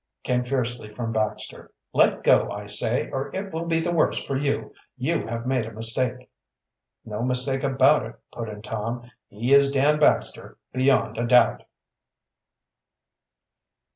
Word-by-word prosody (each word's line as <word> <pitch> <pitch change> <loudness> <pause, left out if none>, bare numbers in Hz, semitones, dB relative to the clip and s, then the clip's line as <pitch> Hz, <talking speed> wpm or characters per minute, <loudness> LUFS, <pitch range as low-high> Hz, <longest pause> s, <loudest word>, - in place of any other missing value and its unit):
came 125 -1 0
fiercely 125 -3 -3
from 115 +1 -4
Baxter. 110 -1 -3 0.2
"Let - - +3
go, - - +4
I 105 0 -6
say, 110 +4 +2
or 135 +1 -3
it 195 -1 -5
will 165 +1 -3
be 165 -1 +1
the 175 +1 -1
worse 165 -2 +2
for 135 - -3
you. 140 +1 -2 0.2
You 130 +3 -1
have 115 +1 -5
made 130 -3 0
a - - -8
mistake." 120 +3 -1 0.8
"No 105 0 -5
mistake 130 +2 +1
about 135 0 +3
it," 115 - -12 0.2
put 115 -2 -6
in 105 0 -9
Tom. 115 +3 -5 0.2
"He 120 +6 -1
is 140 0 +6
Dan 145 +2 +2
Baxter 150 - +1 0.2
beyond 130 -2 +1
a 120 - -1
doubt." 125 -2 +4
125 Hz, 150 wpm, -24 LUFS, 115-140 Hz, 0.8 s, is